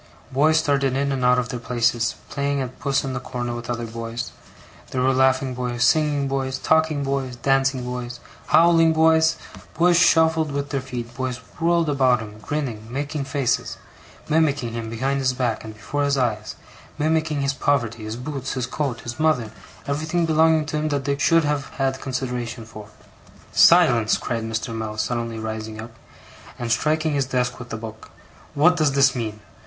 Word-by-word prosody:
Boys 150 +4 +3
started 140 -3 +1
in 140 0 0
and 130 -2 -2
out 125 0 +5
of 125 0 -1
their 125 - -4
places, 120 -1 0
playing 140 0 -1
at 130 -1 -5
puss 140 -1 0
in 135 -1 -3
the 125 - -2
corner 120 -1 -4
with 120 0 -7
other 120 -1 -2
boys; 115 +1 -5 0.6
there 130 - -3
were 135 +1 +3
laughing 130 0 +2
boys, 125 -1 -2
singing 145 0 +2
boys, 135 -1 -2
talking 160 0 +2
boys, 135 -2 -2
dancing 135 +1 +1
boys, 125 -1 -5 0.3
howling 165 -1 +5
boys; 160 0 +4 0.4
boys 170 +1 +4
shuffled 160 -3 +4
with 140 0 -3
their 140 -2 -1
feet, 120 -2 -6
boys 130 -1 -3 0.2
whirled 170 0 +2
about 130 -4 +3
him, 105 -1 -9
grinning, 120 -6 -4
making 145 +2 -3
faces, 135 -2 -1 0.5
mimicking 145 -7 +1
him 115 -1 -4
behind 135 +5 -1
his 130 -1 +1
back 125 -3 -1
and 110 -1 -9
before 115 +8 -3
his 140 -1 +1
eyes; 110 -5 -1 0.4
mimicking 155 -1 0
his 140 0 0
poverty, 120 -6 0
his 110 +1 -5
boots, 135 +1 -5
his 130 -2 -2
coat, 130 -1 -3
his 120 +3 -7
mother, 145 -9 +1 0.3
everything 155 +4 -1
belonging 160 0 +3
to 150 - -3
him 155 +1 -1
that 140 -2 -2
they 140 0 +1
should 165 +3 +3
have 145 -2 -1
had 135 -1 -1
consideration 125 -3 -4
for. 105 -2 -11 0.6
'Silence!' 130 -11 +5
cried 115 -2 -3
Mr. 115 +1 -3
Mell, 110 -1 -4
suddenly 115 +1 -2
rising 110 0 -5
up, 115 +2 -8 0.7
and 120 -1 -3
striking 155 +5 +1
his 140 -2 0
desk 125 -1 -1
with 125 -1 -9
the 115 - -4
book. 110 0 -9 0.5
'What 170 +5 +5
does 155 -5 +2
this 135 -1 +4
mean! 110 -3 -4
130 Hz, 180 wpm, -23 LUFS, 120-145 Hz, 0.7 s, out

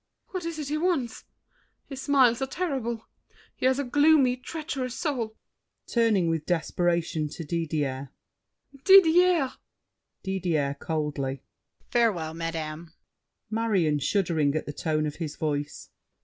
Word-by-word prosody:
What 370 -3 -5
is 335 -1 -4
it 295 -2 -4
he 305 +1 -1
wants? 315 -9 -1 0.6
His 270 -2 -7
smiles 260 -4 +4
are 270 - 0
terrible. 260 -9 -3 0.5
He 255 - +1
has 260 0 +3
a 280 - 0
gloomy, 285 -1 +4
Treacherous 260 -2 -5
soul. 245 -9 -2 0.5
[Turning 225 -7 +2
with 165 -2 -1
desperation 170 -2 0
to 165 - -7
Didier. 145 -4 -2 0.7
Didier! 355 -5 +6 0.7
DIDIER 165 -7 -1
(coldly). 145 -4 -3 0.5
Farewell, 200 -10 +1
madame! 165 0 -5 0.6
MARION 195 -10 +1
(shuddering 155 -2 +1
at 155 - -1
the 145 - -6
tone 155 0 -1
of 150 -1 -4
his 155 -3 -4
voice). 145 -1 -3
195 Hz, 120 wpm, -27 LUFS, -, 0.7 s, Didier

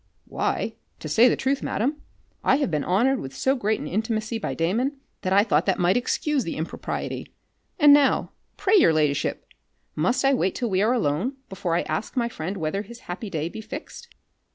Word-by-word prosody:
"Why, - - -2 0.2
to - - -7
say 240 +3 +5
the - - +2
truth, 270 +1 0
madam, 285 +7 -1 0.4
I - - +4
have 280 - 0
been 150 -2 0
honoured 240 +8 +2
with 135 0 -7
so 265 - +2
great 220 -4 0
an - - -6
intimacy 220 +2 -2
by - - -3
Damon, 240 - 0 0.2
that 185 - -2
I 200 +1 +6
thought 175 -5 +1
that 190 - +2
might 180 +2 +3
excuse 275 +3 0
the 165 - -4
impropriety. 160 +2 -4 0.5
And 295 -2 +8
now, 285 -2 +3 0.3
pray 415 +2 +3
your 165 - +5
ladyship, 150 -2 0 0.5
must 240 - +1
I 275 - +5
wait 190 -8 +1
till 240 -4 -2
we 190 0 +2
are 225 +4 +3
alone, 195 - 0 0.2
before 190 -3 -2
I 175 - +1
ask 225 - -4
my 235 -1 +1
friend 190 -1 -5
whether 160 +3 -2
his 235 +3 -11
happy 195 +4 -6
day 160 -3 -2
be 220 - -7
fixed?" 240 - -8
215 Hz, 200 wpm, -25 LUFS, 175-255 Hz, 0.5 s, And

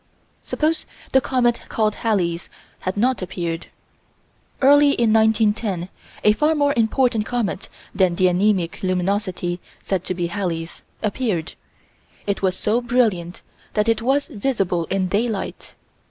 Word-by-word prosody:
Suppose 310 +1 -1 0.2
the 265 - +5
comet 240 -3 +1
called 215 -2 +1
Halley's 180 -7 -1 0.3
had 185 +2 -3
not 250 +3 +2
appeared 175 -3 -4 0.9
Early 285 +1 +6
in 230 -4 +2
1910, 215 -4 +2 0.3
a 210 - +6
far 300 +8 +2
more 285 -1 +2
important 230 -1 +2
comet 240 -6 -2 0.2
than 185 -3 +2
the 185 - +2
anæmic 185 -1 +1
luminosity 185 -1 -1 0.2
said 190 -2 -2
to 185 - -2
be 175 -1 -1
Halley's, 170 -3 -3 0.2
appeared. 205 -6 -1 0.7
It 200 -1 -1
was 185 -1 +1
so 225 +3 +1
brilliant 220 -8 0 0.3
that 210 0 +2
it 225 -1 +2
was 270 +4 +1
visible 200 - -1
in 190 +1 0
daylight. 210 +2 -2
210 Hz, 130 wpm, -22 LUFS, 185-240 Hz, 0.9 s, Early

